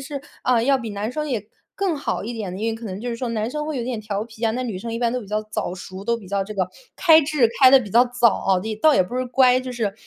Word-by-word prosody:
是， 275 Hz, 0 st, -6 dB, 0.2 s
啊， 245 Hz, -2 st, +2 dB
要 270 Hz, +1 st, +3 dB
比 230 Hz, -2 st, -6 dB
男 205 Hz, +4 st, -4 dB
生 300 Hz, +1 st, -3 dB
也 220 Hz, -6 st, -3 dB, 0.3 s
更 375 Hz, -6 st, 0 dB
好 275 Hz, -, -3 dB
一 240 Hz, -, -4 dB
点 200 Hz, -5 st, -5 dB
的。 185 Hz, -, -6 dB
因 225 Hz, -, 0 dB
为 -, -, -3 dB
可 225 Hz, +1 st, -9 dB
能 190 Hz, -1 st, -6 dB
就 245 Hz, -, -4 dB
是 -, -, -3 dB
说 245 Hz, 0 st, -3 dB
男 220 Hz, 0 st, -1 dB
生 300 Hz, +2 st, -3 dB
会 310 Hz, -3 st, -3 dB
有 235 Hz, -, -3 dB
点 245 Hz, -3 st, -3 dB
调 210 Hz, 0 st, -3 dB
皮 225 Hz, 0 st, -15 dB
啊， 225 Hz, -, +3 dB
那 255 Hz, +2 st, -2 dB
女 220 Hz, -6 st, -4 dB
生 230 Hz, +3 st, -6 dB
一 230 Hz, -, -3 dB
般 235 Hz, -1 st, +1 dB
都 250 Hz, -, -2 dB
比 205 Hz, -, -11 dB
较 210 Hz, 0 st, 0 dB
早 215 Hz, -4 st, -3 dB
熟， 185 Hz, +1 st, -9 dB
都 235 Hz, +2 st, +1 dB
比 215 Hz, -4 st, -12 dB
较 200 Hz, 0 st, 0 dB
这 215 Hz, -, -7 dB
个 185 Hz, -3 st, 0 dB, 0.3 s
开 320 Hz, -3 st, +6 dB
智 280 Hz, -5 st, +2 dB
开 260 Hz, -1 st, +9 dB
得 270 Hz, -, +8 dB
比 210 Hz, -, -7 dB
较 240 Hz, +4 st, +6 dB
早 245 Hz, -1 st, +3 dB, 0.2 s
哦。 185 Hz, -1 st, +3 dB, 0.2 s
倒 310 Hz, -2 st, +6 dB
也 -, -, +5 dB
不 240 Hz, +8 st, -6 dB
是 255 Hz, -, 0 dB
乖， 255 Hz, 0 st, +4 dB
就 255 Hz, 0 st, -6 dB
是 225 Hz, -5 st, -2 dB
235 Hz, 340 characters per minute, -22 LUFS, 210-255 Hz, 0.3 s, 开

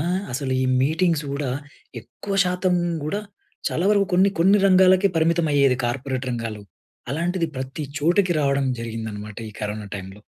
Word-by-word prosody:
ఆహ్, 180 Hz, +4 st, 0 dB
అసలు 130 Hz, 0 st, -2 dB
ఈ -, -, +1 dB, 0.2 s
మీటింగ్స్ 160 Hz, +1 st, +1 dB
కూడా 140 Hz, -2 st, -2 dB, 0.5 s
ఎక్కువ 125 Hz, -, -7 dB
శాతం 180 Hz, 0 st, +1 dB, 0.3 s
కూడా 200 Hz, +7 st, -2 dB, 0.5 s
చాలా 170 Hz, -, -1 dB
వరకు 200 Hz, -2 st, +3 dB
కొన్ని 190 Hz, +2 st, +4 dB
కొన్ని 195 Hz, +5 st, +5 dB
రంగాలకే 185 Hz, 0 st, +5 dB
పరిమితం 165 Hz, +1 st, +2 dB
అయ్యేది 140 Hz, -3 st, +4 dB
కార్పొరేట్ 130 Hz, +1 st, -2 dB
రంగాల్లో. 115 Hz, -3 st, -4 dB, 0.5 s
అలాంటిది 170 Hz, +3 st, -1 dB
ప్రతి 130 Hz, +4 st, -5 dB, 0.2 s
చోటకి 175 Hz, +4 st, +2 dB
రావడం 140 Hz, -1 st, +1 dB
జరిగిందనమాట 110 Hz, -3 st, -6 dB
ఈ -, -, -16 dB
కరోనా 105 Hz, 0 st, -4 dB
టైమ్‌లో. 95 Hz, +1 st, -8 dB
150 Hz, 145 wpm, -23 LUFS, 120-180 Hz, 0.5 s, కొన్ని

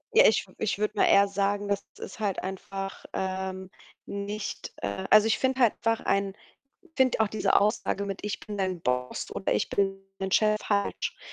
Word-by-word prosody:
Ja, -, -, +8 dB
ich -, -, +3 dB
ich 205 Hz, -4 st, 0 dB
würde 210 Hz, +1 st, -1 dB
mal -, -, +4 dB
eher 200 Hz, 0 st, +6 dB
sagen, 200 Hz, +1 st, 0 dB
das 200 Hz, 0 st, -1 dB
ist 190 Hz, -, -9 dB
halt 205 Hz, -3 st, -1 dB
einfach, 195 Hz, +1 st, -6 dB
ähm, 190 Hz, 0 st, -3 dB, 0.3 s
nicht, 200 Hz, +1 st, -5 dB
äh 100 Hz, -, -3 dB
also, 215 Hz, 0 st, +7 dB
ich 225 Hz, -, +2 dB
finde 260 Hz, 0 st, +1 dB
halt 235 Hz, -4 st, +5 dB, 0.3 s
ein 195 Hz, 0 st, +1 dB, 0.6 s
finde 260 Hz, -4 st, +3 dB
auch 220 Hz, -, +4 dB
diese 215 Hz, -, +2 dB
Aussage 200 Hz, -1 st, 0 dB
mit 195 Hz, -1 st, -5 dB
„ich 210 Hz, -, -3 dB
bin 210 Hz, -1 st, -7 dB
dein 185 Hz, -2 st, -1 dB
Boss” 125 Hz, -3 st, -2 dB
oder 190 Hz, -, -1 dB
„ich -, -, +1 dB
bin 195 Hz, -1 st, 0 dB, 0.2 s
dein 190 Hz, 0 st, -3 dB
Chef” 215 Hz, +2 st, +4 dB
falsch. 200 Hz, -1 st, -1 dB
200 Hz, 180 wpm, -28 LUFS, 190-210 Hz, 0.6 s, Ja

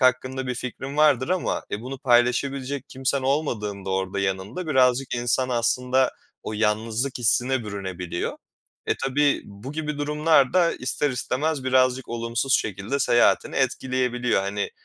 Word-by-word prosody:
hakkında 130 Hz, +1 st, +1 dB
bir 125 Hz, -, -2 dB
fikrin 130 Hz, +3 st, -6 dB
vardır 150 Hz, -4 st, +4 dB
ama, 185 Hz, 0 st, -1 dB
e, 105 Hz, -, -3 dB
bunu 130 Hz, +3 st, -6 dB
paylaşabilecek 130 Hz, +2 st, +1 dB
kimsen 135 Hz, +1 st, -1 dB
olmadığında 110 Hz, -9 st, -1 dB
orada, 95 Hz, +1 st, -1 dB
yanında 95 Hz, -, -3 dB
birazcık 130 Hz, -3 st, +2 dB
insan 120 Hz, +2 st, 0 dB
aslında 125 Hz, +2 st, +2 dB, 0.3 s
o -, -, -5 dB
yalnızlık 110 Hz, +4 st, 0 dB
hissine 120 Hz, +2 st, +2 dB
bürünebiliyor. 95 Hz, -4 st, -4 dB, 0.5 s
E, -, -, +2 dB
tabii 145 Hz, +2 st, +2 dB
bu 100 Hz, +7 st, -9 dB
gibi 150 Hz, -1 st, -3 dB
durumlar 150 Hz, -1 st, +3 dB
da 175 Hz, -2 st, +4 dB
ister 135 Hz, +3 st, -1 dB
istemez 135 Hz, +3 st, -2 dB
birazcık 130 Hz, 0 st, +2 dB
olumsuz 115 Hz, +3 st, 0 dB
şekilde 105 Hz, +6 st, -3 dB
seyahatini 120 Hz, -3 st, +3 dB
etkileyebiliyor. 125 Hz, -3 st, 0 dB
Hani, 100 Hz, +1 st, -2 dB
125 Hz, 135 wpm, -24 LUFS, 115-135 Hz, 0.5 s, vardır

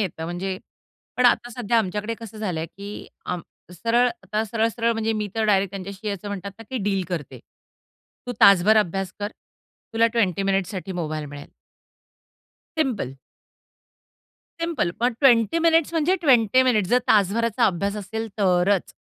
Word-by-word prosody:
येतं 170 Hz, -5 st, -3 dB
म्हणजे 185 Hz, +3 st, -4 dB, 0.6 s
पण 250 Hz, -, +5 dB
आता 240 Hz, 0 st, +2 dB
सध्या 235 Hz, -1 st, 0 dB
आमच्याकडे 210 Hz, +2 st, -2 dB
कसं 220 Hz, -1 st, -9 dB
झालंय 175 Hz, -7 st, -2 dB
की 200 Hz, +4 st, -9 dB, 0.2 s
आम 180 Hz, -1 st, -3 dB, 0.3 s
सरळ 235 Hz, +7 st, +2 dB, 0.2 s
आता 215 Hz, +1 st, -2 dB
सरळ-सरळ 230 Hz, +1 st, 0 dB
म्हणजे 225 Hz, 0 st, -1 dB
मी 210 Hz, -1 st, -2 dB
तर 220 Hz, -1 st, 0 dB
डायरेक्ट 195 Hz, -2 st, +2 dB
त्यांच्याशी 200 Hz, +2 st, -6 dB
असं 200 Hz, +1 st, -5 dB
म्हणतात 200 Hz, -1 st, -5 dB
ना -, -, -9 dB
की 260 Hz, -, -2 dB
डील 195 Hz, -1 st, 0 dB
करते. 165 Hz, -6 st, -5 dB, 0.9 s
तू 245 Hz, -, -3 dB
तासभर 200 Hz, +2 st, +7 dB
अभ्यास 195 Hz, -2 st, 0 dB
कर, 205 Hz, +1 st, -2 dB, 0.6 s
तुला 225 Hz, +1 st, +4 dB
20 200 Hz, -5 st, +1 dB
मिनिट्ससाठी 195 Hz, 0 st, -1 dB
मोबाईल 155 Hz, -3 st, -3 dB
मिळेल. 145 Hz, 0 st, -10 dB, 1.3 s
सिंपल. 245 Hz, -, -1 dB, 1.5 s
सिंपल 335 Hz, -, 0 dB
पण 245 Hz, +1 st, +2 dB
20 245 Hz, +3 st, +4 dB
मिनीट्स 330 Hz, -1 st, +3 dB
म्हणजे 330 Hz, +3 st, +2 dB
20 255 Hz, -3 st, +5 dB
मिनिट्स, 215 Hz, -7 st, +2 dB
जर 250 Hz, -, +5 dB
तासभराचा 220 Hz, +3 st, +3 dB
अभ्यास 200 Hz, +3 st, -1 dB
असेल 220 Hz, +2 st, -5 dB
तरच. 185 Hz, 0 st, +2 dB
210 Hz, 145 wpm, -23 LUFS, 190-230 Hz, 1.5 s, तासभर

